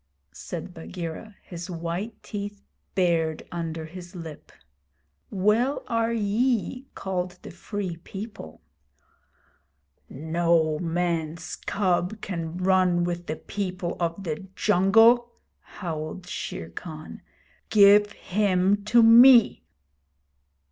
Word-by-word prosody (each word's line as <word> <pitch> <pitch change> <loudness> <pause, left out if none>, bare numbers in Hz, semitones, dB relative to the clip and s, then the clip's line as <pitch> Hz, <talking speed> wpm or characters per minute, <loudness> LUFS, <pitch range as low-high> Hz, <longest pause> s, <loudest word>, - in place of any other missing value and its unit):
said - - -7
Bagheera, 165 - -7
his 175 +1 -8
white 175 +6 -5
teeth 205 0 -6 0.3
bared 165 -4 +1
under 165 -2 -4
his 175 +3 -11
lip. 165 -4 -9 0.8
'Well 215 +8 +1
are 230 -2 0
ye 235 +4 0
called 180 -1 -3
the - - -9
Free 185 -1 -5
People!' 190 - -9 1.5
'No 160 +1 +1
man's 170 -2 -2
cub 185 +1 -1
can 170 -4 -5
run 185 -1 +3
with 175 0 -3
the 155 - -2
people 185 -1 -4
of 170 +2 -2
the 175 +3 -5
jungle,' 225 +8 +4 0.3
howled 165 0 -6
Shere 85 - -6
Khan. 155 - -9 0.5
'Give 205 0 +6
him 200 0 +1
to 235 +2 +5
me!' 235 +1 +7
180 Hz, 100 wpm, -25 LUFS, 170-205 Hz, 1.5 s, me